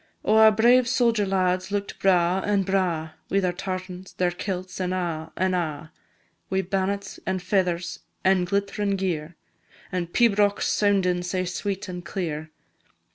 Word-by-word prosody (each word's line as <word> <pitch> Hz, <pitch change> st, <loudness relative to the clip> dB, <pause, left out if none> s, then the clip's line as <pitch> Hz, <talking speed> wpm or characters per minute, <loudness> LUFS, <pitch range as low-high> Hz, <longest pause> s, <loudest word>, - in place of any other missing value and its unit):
Oh, 215 Hz, -, +4 dB
our 220 Hz, 0 st, +8 dB
brave 240 Hz, +3 st, +4 dB
sodger 235 Hz, -5 st, +2 dB
lads 185 Hz, -1 st, +1 dB
look'd 200 Hz, 0 st, -3 dB
braw, 180 Hz, -1 st, +3 dB
an' 200 Hz, -1 st, +1 dB
braw, 180 Hz, -5 st, 0 dB, 0.2 s
Wi' 195 Hz, -, +2 dB
their 180 Hz, -2 st, 0 dB
tartans, 185 Hz, 0 st, -6 dB
their 180 Hz, -1 st, +1 dB
kilts, 185 Hz, +1 st, -5 dB
an' 180 Hz, 0 st, -1 dB
a', 165 Hz, -3 st, -3 dB
an' 185 Hz, 0 st, +1 dB
a', 155 Hz, -3 st, -3 dB, 0.6 s
Wi' 190 Hz, 0 st, 0 dB
bannets 195 Hz, +1 st, -2 dB
an' 190 Hz, -, +1 dB
feathers, 180 Hz, -2 st, -1 dB, 0.2 s
an' 190 Hz, -1 st, +3 dB
glittrin' 200 Hz, +2 st, -1 dB
gear, 175 Hz, -4 st, -3 dB, 0.6 s
An' 180 Hz, -2 st, -2 dB
pibrochs 205 Hz, 0 st, +2 dB
soundin' 190 Hz, -4 st, +2 dB
sae 185 Hz, +1 st, -2 dB
sweet 195 Hz, +2 st, -3 dB
an' 180 Hz, -1 st, -6 dB
clear. 160 Hz, -4 st, -4 dB
185 Hz, 145 wpm, -25 LUFS, 180-200 Hz, 0.6 s, our